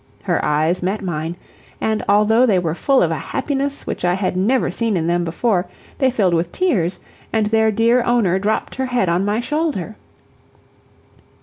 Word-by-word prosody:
Her - - 0
eyes 155 +4 +1
met 195 +3 -2
mine, 165 -2 -3 0.4
and, 220 -1 -1
although 215 +4 +4
they 200 -5 +3
were 170 -3 -1
full 270 - +2
of - - 0
a - - -2
happiness 280 0 -3
which - - -5
I 175 0 +2
had 190 -1 -2
never 225 +8 +1
seen 225 -4 -1
in 160 - -1
them 175 +1 +1
before, 180 +2 0 0.3
they 265 -2 +3
filled 205 -8 +1
with 170 +1 0
tears, 200 - 0 0.3
and 220 -1 +1
their 220 +1 +2
dear 230 +3 +3
owner 210 -7 +2
dropped 215 +3 -1
her 265 0 -1
head 245 -8 0
on 175 +3 +1
my 205 +2 0
shoulder. 275 - -2
210 Hz, 180 wpm, -19 LUFS, 175-240 Hz, 0.4 s, although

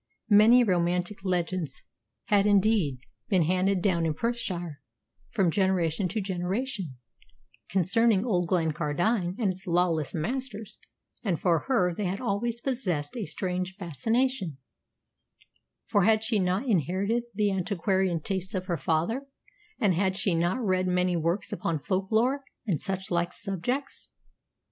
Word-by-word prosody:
Many 225 +4 +7
romantic 180 0 0
legends 180 -5 -2 0.4
had, 205 -1 +3
indeed, 200 - +3 0.3
been 185 -4 +4
handed 185 +2 +1
down 175 -5 +2
in 155 - -1
Perthshire 175 -9 -3 0.5
from 190 -7 +2
generation 185 -2 +1
to 215 +5 -2
generation 190 - -3 0.7
concerning 200 +3 +3
old 180 -7 +1
Glencardine 175 +3 0
and 210 -6 +1
its 190 +1 -11
lawless 170 -4 +1
masters, 220 - -4 0.4
and 185 -8 0
for 170 -4 +1
her 185 -10 +2
they 205 +4 -3
had 185 +2 -2
always 235 +1 -1
possessed 185 - -2
a 225 -7 -3
strange 185 +3 -3
fascination, 200 - -1 1.3
for 205 - +2
had 220 +2 +4
she 220 -1 +1
not 185 +6 0
inherited 200 - +1
the 205 -1 +2
antiquarian 190 -1 0
tastes 190 +4 -3
of 185 -1 -2
her 175 -3 -1
father, 185 - -1 0.5
and 205 -7 +3
had 190 +2 +1
she 195 - +2
not 175 +8 +1
read 185 -1 +1
many 180 0 +1
works 170 +4 -1
upon 170 -2 -1
folklore 220 - 0 0.2
and 175 -9 -1
such 190 0 -3
like 170 0 +1
subjects. 225 +8 -3
190 Hz, 135 wpm, -28 LUFS, 175-215 Hz, 1.3 s, Many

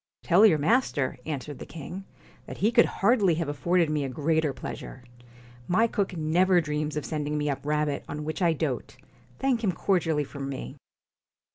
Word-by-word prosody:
'Tell 190 +5 +6
your 165 -7 +4
master,' 150 - +1
answered 145 -2 -5
the - - -6
king, 175 +5 -8 0.4
'that - - -7
he 215 +4 +2
could 235 0 +5
hardly 200 -5 +2
have 165 -1 -2
afforded 170 +4 +1
me 150 -1 -1
a 135 - -3
greater 155 +3 +1
pleasure. 130 0 -8 0.6
My 220 +6 +3
cook 200 -5 -2
never 175 +4 +3
dreams 150 -1 -2
of 150 - -3
sending 150 -1 -2
me 150 0 0
up 135 - -5
rabbit, 150 -1 -1
on 150 +1 -4
which 155 +4 -4
I 170 -2 +4
dote. 145 -6 -3 0.4
Thank 255 -4 0
him 200 - +2
cordially 165 -5 +1
from 140 -1 -6
me.' 65 - -6
155 Hz, 175 wpm, -27 LUFS, 145-185 Hz, 0.6 s, Tell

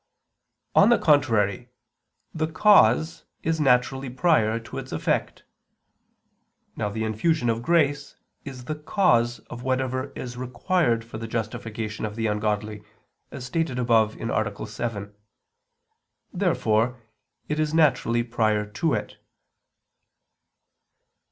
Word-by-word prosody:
On 205 - +6
the 240 - +5
contrary, 120 - +2 0.6
The 155 0 -1
cause 160 - +4 0.2
is 160 0 0
naturally 130 0 +2
prior 120 -5 +2
to 115 - -7
its - - -9
effect. - - -2 1.3
Now 105 - -2
the 110 +2 -3
infusion 120 +4 +1
of 115 0 -3
grace 145 -1 +1 0.3
is 130 -3 -9
the 155 - -3
cause 150 - +1
of 120 - -10
whatever 130 +1 -2
is 120 -1 -7
required 125 -1 0
for 115 -1 -8
the 115 - -5
justification 110 -1 -4
of 105 -1 -4
the 115 0 -2
ungodly, 105 0 -2 0.5
as 130 -3 -8
stated 160 -1 -2
above 115 -3 +2
(A. 110 -3 -2
7). 105 -2 -5 1.2
Therefore 125 - +1 0.5
it 150 0 -2
is 155 -1 0
naturally 130 -7 +2
prior 110 -3 0
to 110 +10 -1
it. - - -5
120 Hz, 115 wpm, -25 LUFS, 110-150 Hz, 1.3 s, On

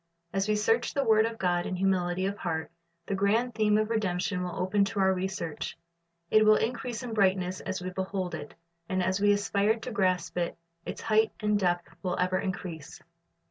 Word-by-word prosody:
As 195 +1 0
we 215 - +2
search 225 +3 +1
the 280 - +2
word 220 -1 +4
of 230 0 -6
God 175 -3 0
in 185 - -2
humility 185 -1 +1
of 200 +1 -1
heart, 160 -5 -3 0.3
the - - -3
grand 215 +5 +1
theme 215 -1 +3
of 215 +1 0
redemption 185 -3 0
will 180 - -4
open 200 +2 +2
to 200 +1 -3
our 190 0 +4
research. 185 -3 -4 0.5
It 215 0 +6
will 215 0 +7
increase 235 +1 -2
in 240 -2 -5
brightness 185 -3 +2
as 190 -1 -4
we 185 - -3
behold 190 -1 -3
it, 145 -2 -7 0.3
and 185 -1 +1
as 185 +2 0
we 205 0 +5
aspire 205 +1 +2
to 230 +3 -6
grasp 185 -4 0
it, 170 - -2 0.3
its - - -5
height 220 0 +3
and 210 -1 +1
depth 175 -2 +1
will 180 0 -2
ever 185 +1 +1
increase. 185 -6 -5
195 Hz, 195 wpm, -29 LUFS, 180-215 Hz, 0.5 s, will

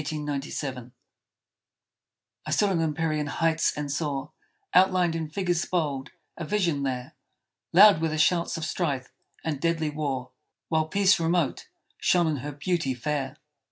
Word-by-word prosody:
I - - -8
stood 145 -4 -4 1.8
on 170 -3 +1
empyrean 155 -1 -1
heights 160 +2 +1
and 145 -1 -3
saw, 145 -1 -2 0.4
Outlined 180 -2 +4
in 160 -2 -3
figures 175 0 0
bold, 145 -7 -1 0.3
a 170 - -6
vision 170 -5 0
there; 130 -2 -3 0.6
Loud 195 -2 +7
were 165 - +2
the 155 - -2
shouts 170 +2 +2
of 160 - -3
strife 140 -7 -2 0.3
and 150 -4 -2
deadly 165 -2 0
war, 135 -4 -3 0.4
While 160 -1 +1
Peace, 195 +1 +3
remote, 165 -2 0 0.3
shone 175 -1 +3
in 155 -2 0
her 145 +3 -5
beauty 145 -2 -1
fair. 135 +2 -3
155 Hz, 135 wpm, -26 LUFS, 145-170 Hz, 1.8 s, Loud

